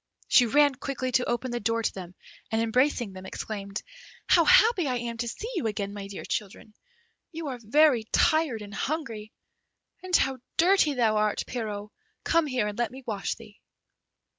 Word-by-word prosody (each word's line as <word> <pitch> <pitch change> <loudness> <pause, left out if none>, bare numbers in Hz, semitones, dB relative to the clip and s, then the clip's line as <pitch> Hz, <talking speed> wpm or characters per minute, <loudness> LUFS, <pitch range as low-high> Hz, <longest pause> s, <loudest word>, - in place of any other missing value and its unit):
She 245 - +5
ran 290 +4 +4
quickly 265 -1 -4
to 250 0 +1
open 240 +1 -2
the 240 - -2
door 230 +1 0
to - - 0
them, 180 -1 -9 0.4
and, 225 - +1
embracing 240 -1 +1
them, 185 0 -9
exclaimed, 200 -1 -5 0.4
"How 335 -2 +5
happy 465 -8 +5
I 255 - 0
am 235 -1 -4
to 235 +1 -3
see 425 - -5
you 225 - -1
again, 205 -2 -3
my 200 -1 -7
dear 195 - -8
children; 210 +1 -5 0.6
you 320 -3 -5
are 250 -2 -5
very 245 0 +4
tired 310 -9 +2
and 205 0 -10
hungry. 225 -5 -4 0.7
And 370 -1 0
how 270 -4 +2 0.2
dirty 340 -4 +4
thou 225 -4 +2
art, 210 -1 +1
Pierrot; 210 -4 -5 0.3
come 330 -2 +2
here 255 -6 0
and 210 +2 -5
let 240 - +1
me 260 +1 -11
wash 205 -3 -2
thee." 215 -3 -15
235 Hz, 180 wpm, -27 LUFS, 210-285 Hz, 0.7 s, She